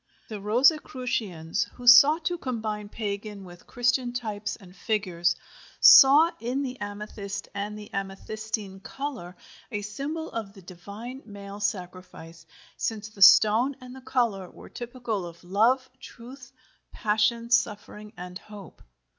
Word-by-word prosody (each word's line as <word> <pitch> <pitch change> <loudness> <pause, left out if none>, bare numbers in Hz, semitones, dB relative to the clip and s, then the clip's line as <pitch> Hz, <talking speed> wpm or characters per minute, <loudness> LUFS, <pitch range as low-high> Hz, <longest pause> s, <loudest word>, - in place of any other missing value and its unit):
The 215 -2 -6
Rosicrucians, 225 - 0
who 245 - -11
sought 285 +7 +7
to 350 -1 -1
combine 215 -6 -4
pagan 205 -1 -5
with 175 -2 -14
Christian 245 0 0
types 215 -4 -4
and 185 -4 -16
figures, 180 -5 0 0.4
saw 295 +5 +8
in 250 +5 -2
the 255 -1 -6
amethyst 205 -1 -6
and 205 +1 -4
the 210 0 -11
amethystine 195 +1 -5
color 235 -6 -7 0.3
a 205 -2 -3
symbol 285 +10 -5
of 215 -3 -5
the 195 -3 -15
divine 200 +9 -9
male 200 -1 -9
sacrifice, 180 -4 -6 0.3
since 215 -1 -3
the 210 -2 -15
stone 220 +7 +6
and 255 -1 -11
the 265 - -11
color 235 -8 -1
were - - -14
typical 240 -4 -5
of 170 0 -10
love, 230 +8 +2
truth, 255 +1 -12 0.4
passion, 225 +2 0
suffering, 210 -3 -1
and 180 +1 -8
hope. 205 -5 -13
215 Hz, 130 wpm, -26 LUFS, 195-245 Hz, 0.4 s, saw